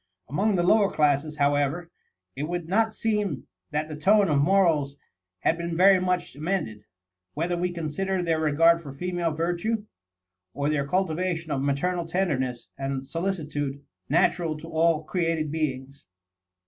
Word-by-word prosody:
Among 195 - +1
the 175 - +2
lower 200 +2 +4
classes, 150 -1 +1
however, 145 +4 +1 0.4
it 150 +4 -4
would 175 -2 -3
not 220 +5 +2
seem 210 - -1 0.2
that 150 +1 -2
the 155 - -6
tone 200 +5 +4
of 145 -2 +3
morals 155 -5 +2 0.4
had 165 - +1
been 170 -1 -3
very 190 +1 +6
much 180 -5 -1
amended, 145 - -3 0.5
whether 170 +4 -1
we 180 +1 -1
consider 175 +3 -2
their 165 -2 +1
regard 165 +2 +4
for 140 -4 -9
female 175 +1 -1
virtue, 175 +7 -1 0.7
or 145 +1 0
their 140 -2 0
cultivation 170 -1 -1
of 135 - 0
the 140 - 0
maternal 170 +5 0
tenderness 135 -9 -1
and 135 -1 -3
solicitude 150 -5 -3 0.2
natural 165 -3 +2
to 165 - -10
all 160 -1 +2
created 165 -2 -1
beings. 135 -6 -4
165 Hz, 145 wpm, -26 LUFS, 145-180 Hz, 0.7 s, very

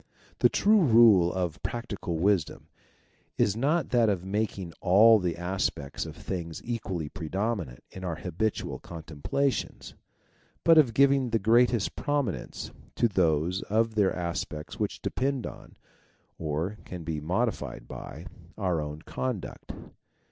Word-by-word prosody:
The - - +5
true 210 0 +4
rule 110 - +6
of 90 -4 -3
practical 100 -8 -4
wisdom 95 -1 0 0.7
is 100 - +2
not 145 +6 +1
that 120 -3 +4
of 95 -3 -1
making 95 -3 -2
all 105 +4 +7
the 90 -3 -2
aspects 90 -5 -2
of - - -8
things 85 -3 -5
equally 100 -9 -3
prominent 95 - -3
in 95 - -9
our 85 -3 -2
habitual 90 +6 -2
.contemplations, 85 - -3 0.7
but 165 -1 +7
of 120 -7 +3
giving 135 -1 +4
the 115 - +2
greatest 115 0 +3
prominence 145 -8 -2 0.2
to 120 - +3
those 90 -2 +1
of 110 +2 +2
their 105 -3 +3
aspects 85 -3 -4
which - - -3
depend 135 -1 -1
on, - - -10 0.6
or 80 +6 -2
can 90 -2 -8
be 80 -1 -3
modified 90 - -2
by, 80 +5 -8 0.3
our 90 -6 0
own 75 +1 -6
conduct. 125 -7 -4
95 Hz, 130 wpm, -28 LUFS, 85-115 Hz, 0.7 s, all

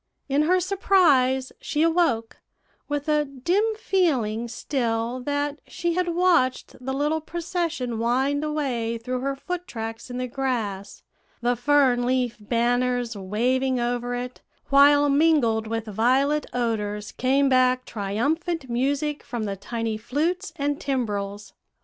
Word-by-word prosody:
In 280 +1 +2
her 365 0 +4
surprise, 330 -9 +3
she 300 +1 0
awoke, 325 -10 +1 0.5
with 290 +1 -2
a 300 -1 +3
dim 295 +9 0
feeling 255 - 0
still 235 -1 -2
that 285 +2 -2
she 345 -1 -2
had 365 +1 0
watched 340 -8 +2
the 265 - -2
little 295 +4 0
procession 330 -8 -3
wind 265 +5 +1
away 260 -7 -1
through 250 +2 -3
her 275 +2 -2
foot 360 +5 -5
tracks 225 -1 -6
in 245 - -5
the 250 0 -2
grass, 230 -7 -3 0.4
the 245 +1 +2
fern 255 -1 +3
leaf 250 -1 0
banners 245 +2 0
waving 250 +7 0
over 245 0 -1
it, 250 +1 -6 0.3
while 285 +1 +6
mingled 280 -7 +3
with 225 0 -3
violet 260 +8 +1
odors 210 -4 -2
came 270 +2 +2
back 255 -1 +3
triumphant 265 - -2
music 285 +4 0
from 235 -2 -5
the 200 -2 -3
tiny 225 +2 -3
flutes 325 - -2
and 290 -2 -2
timbrels. 210 -6 -3
255 Hz, 130 wpm, -24 LUFS, 235-290 Hz, 0.5 s, while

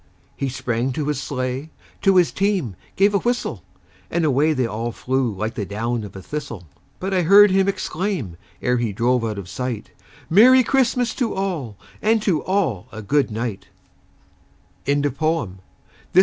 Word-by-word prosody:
He 135 - -2
sprang 125 0 -2
to 150 +2 -2
his 145 -3 -1
sleigh, 130 +2 -3 0.3
to 195 -1 +4
his 180 -2 +4
team 190 - 0 0.2
gave 200 +2 +4
a 200 - +3
whistle, 240 +4 -2 0.5
And 170 -2 0
away 150 +2 +3
they 130 -4 0
all 115 +1 -3
flew 130 +1 -1
like 110 +3 -3
the 110 - -3
down 115 +4 -2
of 100 -1 -9
a 95 - -8
thistle; 120 - -6 0.3
But 190 +1 -3
I 185 - +3
heard 200 +4 +7
him 190 0 +3
exclaim, 185 - -2 0.3
ere 125 0 +2
he 115 -3 -1
drove 120 +3 +1
out 110 -2 -2
of 100 -3 -6
sight, 125 +1 -4 0.4
"Merry 255 +8 +7
Christmas 250 -2 +1
to 245 -4 -1
all, 170 - -3 0.2
and 225 +1 +3
to 180 -8 +1
all 180 - 0
a 110 -1 -8
good 140 +6 +2
night!" 110 -2 -4
135 Hz, 160 wpm, -22 LUFS, 115-195 Hz, 0.5 s, heard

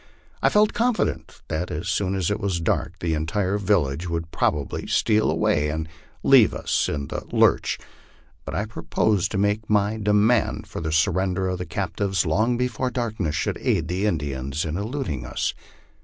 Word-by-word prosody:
I - - +4
felt 210 0 +3
confident 240 0 -1
that 80 +3 -2
as 80 +4 -4
soon 100 -1 0
as 95 -1 0
it 105 - -1
was 100 -5 -1
dark 85 - -1
the 85 -2 0
entire 90 +6 0
village 85 -5 +1
would 85 -1 -3
probably 70 -2 -1
steal 110 -1 +2
away, 75 0 +1
and 80 +1 -3 0.4
leave - - +6
us - - 0
in 70 -2 -3
the - - -3
lurch; - - +3 0.7
but - - -6
I 100 - 0
proposed 105 -2 0
to 105 - -3
make 105 +2 0
my 105 +1 +2
demand 105 +3 +2
for - - -7
the 80 -1 -2
surrender 95 +2 +1
of 90 -1 -3
the 90 - -5
captives 95 +1 -1
long 110 +9 +2
before 125 +1 -1
darkness 110 -10 -2
should 70 - -1
aid 80 -1 0
the 95 +4 0
Indians 70 -4 -2
in 80 0 -3
eluding 100 - -3
us. - - -2
95 Hz, 170 wpm, -24 LUFS, 80-105 Hz, 0.7 s, leave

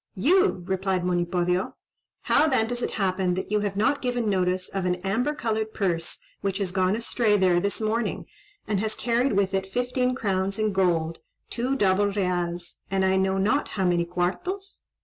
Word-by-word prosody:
"You!" 330 - +3
replied 190 -1 -1
Monipodio. 180 0 0 0.5
"How 305 - +4
then 260 -6 +2
does 245 +1 -3
it - - 0
happen 185 -2 0
that 190 - -4
you 210 - +3
have 200 -1 -2
not 245 +7 +2
given 245 -3 -1
notice 185 -2 0
of 195 -2 -3
an 180 0 +1
amber 245 +10 0
coloured 220 -4 -2
purse 170 -5 -1 0.2
which 195 -1 -1
has 195 -3 -2
gone 185 +1 +2
astray 230 -2 +1
there 185 -2 +3
this 200 +2 -1
morning, 220 +1 -1 0.4
and 210 -2 0
has 215 +1 -1
carried 240 +3 +1
with 195 -1 +1
it 190 0 -2
fifteen 250 +1 0
crowns 195 -4 -1
in 215 -2 0
gold, 170 -4 +1 0.3
two 250 +3 -1
double 200 -4 +3
reals, 175 -3 -2
and 190 0 +1
I 190 0 +3
know 190 0 +1
not 215 +10 +1
how 190 -2 -2
many 175 -1 +2
quartos?" 200 - -3
195 Hz, 180 wpm, -25 LUFS, 185-225 Hz, 0.5 s, How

